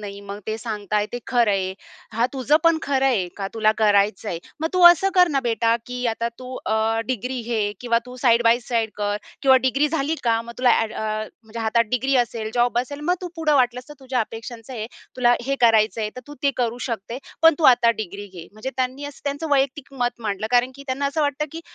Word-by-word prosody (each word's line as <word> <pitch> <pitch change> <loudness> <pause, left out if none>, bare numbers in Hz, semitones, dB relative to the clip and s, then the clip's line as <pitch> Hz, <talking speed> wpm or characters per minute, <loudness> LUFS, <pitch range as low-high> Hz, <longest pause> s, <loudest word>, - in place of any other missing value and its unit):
नाही. 200 -1 -7
मग 200 0 -8
ते 220 0 -2
सांगताय 210 -2 -2
ते 245 - -3
खरं 240 -4 +2
आहे. 190 -1 0 0.4
"हां, 230 +3 +2
तुझं 270 +3 +2
पण 330 -1 +5
खरं 270 -1 0
आहे. 210 -9 +1
का 195 -1 -3
तुला 215 -1 +3
करायचंय. 200 -4 +2 0.2
मग 320 - 0
तू 365 -1 +2
असं 350 +3 +6
कर 360 -1 +6
ना 275 -3 +1
बेटा 230 -1 +1
की 250 0 -5
आता 230 +1 -1
तू 255 0 -8
अ, 220 +1 +1
डिग्री 250 +1 -3
घे 220 -3 -1
किंवा 235 -1 +2
तू 250 0 -10
साइड 240 -2 +4
बाय 235 +2 +4
साइड 225 -3 0
कर 205 0 -1 0.3
किंवा 265 -1 +6
डिग्री 280 +3 +2
झाली 310 0 -1
का 230 -1 +2
मग 235 0 -9
तुला 250 -1 +4
अ‍ॅड 220 -1 -2
अ, - - -5 0.4
म्हणजे 220 +1 -10
हातात 230 +1 +2
डिग्री 260 +2 +1
असेल, 230 -3 -1
जॉब 240 0 +2
असेल. 285 +4 -4
मग 350 +4 +1
तू 360 - -5
पुढं 305 -2 +1
वाटलंस 250 0 +1
तर 295 - -10
तुझ्या 260 -2 -1
अपेक्षांचं 225 +2 -7
आहे. 220 -3 -4 0.3
तुला 245 -1 +4
हे 275 0 0
करायचंय, 220 -2 +3
तर - - -6
तू 290 - -10
ते 280 - +3
करू 240 -1 -1
शकते. 230 +2 -4 0.2
पण 325 -1 +7
तू 315 - -1
आता 235 -1 +3
डिग्री 200 +2 -8
घे." 170 -1 -9
म्हणजे 215 +5 -6
त्यांनी 260 +2 -2
असं 285 -1 -9
त्यांचं 285 +3 -3
वैयक्तिक 275 0 0
मत 240 0 -3
मांडलं, 210 -1 -3
कारण 250 +1 +3
की 280 - -11
त्यांना 270 +2 -1
असं 285 +3 -1
वाटतं 290 +1 0
की 330 - -6
240 Hz, 225 wpm, -22 LUFS, 220-270 Hz, 0.4 s, पण